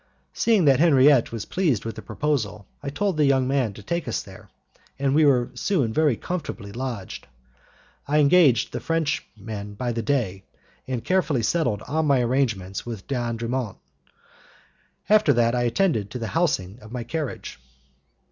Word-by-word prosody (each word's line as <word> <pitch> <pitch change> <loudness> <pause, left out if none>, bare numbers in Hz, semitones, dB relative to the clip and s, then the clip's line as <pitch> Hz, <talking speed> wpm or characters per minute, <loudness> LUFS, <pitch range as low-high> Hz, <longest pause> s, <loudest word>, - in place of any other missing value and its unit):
Seeing 220 -7 +3
that 135 -3 +5
Henriette 140 -5 +5
was 115 -2 -5
pleased 150 - 0
with 115 - -4
the - - -7
proposal, 110 -9 -2 0.2
I 140 - -4
told 190 +4 -1
the 150 - +4
young 135 -2 +3
man 130 -5 +1
to 105 - -12
take 170 - -3
us - - -2
there, - - -14 0.5
and 135 0 0
we 155 +1 +5
were 125 -3 +3
soon 125 - 0
very 150 -3 +3
comfortably 165 - -5
lodged. 120 -4 -6 0.8
I 150 +2 +2
engaged 150 -3 +4
the - - -2
Frenchman 110 -10 -3
by 120 +3 -2
the 115 0 -2
day, 110 -6 -1 0.5
and 125 -3 -3
carefully 165 -10 +1
settled 125 -7 0
all 155 +5 -1
my 140 -4 +3
arrangements 115 -7 -1
with 115 -5 -7
D'Andremont. 120 -3 -3 1.3
After 215 +1 +5
that 115 0 +2
I 120 -1 +1
attended 120 - +1
to 125 - -6
the 115 -2 -4
housing 120 - 0
of 110 +1 -13
my 125 -1 -4
carriage. 150 - -5
130 Hz, 160 wpm, -24 LUFS, 115-150 Hz, 1.3 s, that